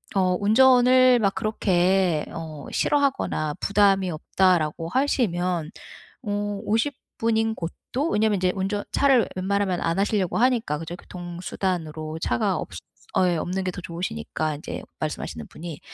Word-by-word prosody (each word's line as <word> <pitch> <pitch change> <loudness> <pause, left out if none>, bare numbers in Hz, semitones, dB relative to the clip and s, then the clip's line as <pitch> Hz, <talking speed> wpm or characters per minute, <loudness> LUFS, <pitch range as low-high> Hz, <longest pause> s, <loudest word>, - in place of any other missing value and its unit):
어 185 -1 +3
운전을 250 +3 +5
막 200 -2 +1
그렇게 185 -5 +1
어 155 -4 -7
싫어하거나 270 - +1
부담이 195 -2 +3
없다라고 165 -1 +1
하시면 180 - 0 0.5
어 205 -1 -2
50 225 +7 +1 0.2
분인 225 -1 +1
곳도 250 - -4
왜냐면 215 -1 +2
이제 180 0 +1
운전 200 +2 -2
차를 270 -4 +4
웬만하면 190 -1 0
안 165 +3 0
하시려고 200 -2 +1
하니까, 235 - +2
그죠? 165 +2 -6
교통수단으로 175 -3 -4
차가 120 - 0
없이 - - -6 0.5
예, 175 -1 +1
없는 185 +4 -2
게 185 - 0
더 180 - -7
좋으시니까 155 - -3
이제 150 - -7 0.2
말씀하시는 80 - -4
분이. 165 -2 -8
190 Hz, 305 characters per minute, -24 LUFS, 165-220 Hz, 0.5 s, 운전을